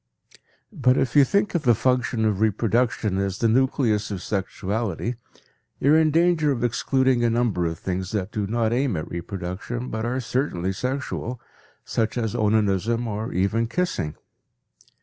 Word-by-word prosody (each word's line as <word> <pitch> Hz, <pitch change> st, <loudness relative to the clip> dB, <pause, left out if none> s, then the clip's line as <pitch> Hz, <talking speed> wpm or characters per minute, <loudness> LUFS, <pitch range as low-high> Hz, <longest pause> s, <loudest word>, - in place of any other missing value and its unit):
But 130 Hz, -, +3 dB
if 125 Hz, 0 st, 0 dB
you 145 Hz, -, +8 dB
think 200 Hz, +9 st, +1 dB
of 170 Hz, -, +1 dB
the 120 Hz, -5 st, +4 dB
function 125 Hz, -1 st, +1 dB
of 105 Hz, -3 st, +1 dB
reproduction 110 Hz, -1 st, +1 dB
as 100 Hz, -1 st, -1 dB
the 115 Hz, -, +2 dB
nucleus 115 Hz, -3 st, +2 dB
of 95 Hz, -4 st, -5 dB
sexuality 100 Hz, +2 st, -2 dB, 0.7 s
you 140 Hz, +3 st, +4 dB
are -, -, +7 dB
in 160 Hz, -1 st, +4 dB
danger 165 Hz, -1 st, +3 dB
of 120 Hz, -3 st, -2 dB
excluding 130 Hz, +1 st, +2 dB
a 120 Hz, -, +3 dB
number 115 Hz, -7 st, +1 dB
of 80 Hz, 0 st, -4 dB
things 95 Hz, +1 st, -3 dB
that 100 Hz, -4 st, -2 dB
do 105 Hz, -2 st, -2 dB
not 115 Hz, +1 st, 0 dB
aim 125 Hz, -, +1 dB
at 75 Hz, -, -4 dB
reproduction 95 Hz, +7 st, -5 dB
but 110 Hz, 0 st, -3 dB
are 125 Hz, +2 st, -1 dB
certainly 110 Hz, -7 st, -1 dB
sexual, 125 Hz, +1 st, -3 dB, 0.5 s
such 110 Hz, +1 st, -1 dB
as 115 Hz, -3 st, -1 dB
onanism 110 Hz, +1 st, +1 dB
or 110 Hz, +1 st, -3 dB
even 100 Hz, +5 st, +1 dB
kissing. 115 Hz, -, -2 dB
115 Hz, 160 wpm, -24 LUFS, 100-130 Hz, 0.7 s, you